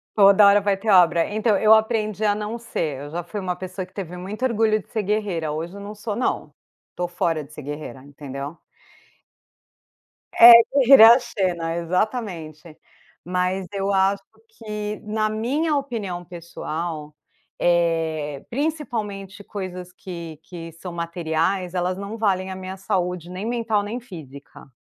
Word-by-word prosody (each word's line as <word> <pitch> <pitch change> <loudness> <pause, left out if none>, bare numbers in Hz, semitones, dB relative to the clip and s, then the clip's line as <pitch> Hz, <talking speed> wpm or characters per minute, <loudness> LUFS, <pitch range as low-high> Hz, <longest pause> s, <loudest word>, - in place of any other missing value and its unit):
Toda 200 0 +7
hora 200 +1 +6
vai 200 0 +1
ter 215 +3 -4
obra. 175 -3 +5
Então, 215 0 +1
eu 215 +2 +6
aprendi 220 -1 +1
a 205 - +4
não 210 +2 -4
ser, 160 - -3
eu 145 - -8
já 175 +1 -4
fui 205 +5 -6
uma 180 -2 -2
pessoa 185 +1 -6
que - - -26
teve 180 -3 -6
muito 205 +7 -6
orgulho 220 -3 +2
de - - -27
ser 215 -2 -2
guerreira, 190 -6 -1
hoje 165 +5 -5
eu 200 - -8
não 205 +1 -7
sou 210 0 -5
não. 250 - -2 0.4
Tô 175 - -2
fora 165 -3 -1
de 145 +2 -16
ser 150 - -8
guerreira, 145 -2 -7
entendeu. 140 +2 -8 1.8
É, 235 +1 +11 0.2
guerreira 270 -4 +8
é - - +11
a - - +1
Xena, 175 -7 -2
exatamente. 170 -4 -3 0.5
Mas 180 +1 -1
eu 195 0 -1
acho 195 +1 +2 0.3
que, 210 -1 -5
na 215 0 -1
minha 275 +9 0
opinião 220 -11 -3
pessoal, 165 -2 -6 0.5
eh, 165 -4 0
principalmente 225 -9 -4
coisas 185 -3 -7
que 170 -4 -9
que 165 -2 -9
são 175 +2 -8
materiais, 170 +2 -1
elas 180 +1 -1
não 200 +3 -6
valem 190 -3 0
a 185 - -5
minha 190 0 -7
saúde 180 -2 -2
nem 185 +3 -6
mental, 230 -3 0
nem 225 +5 -4
física. 145 - -12
190 Hz, 155 wpm, -23 LUFS, 170-215 Hz, 1.8 s, É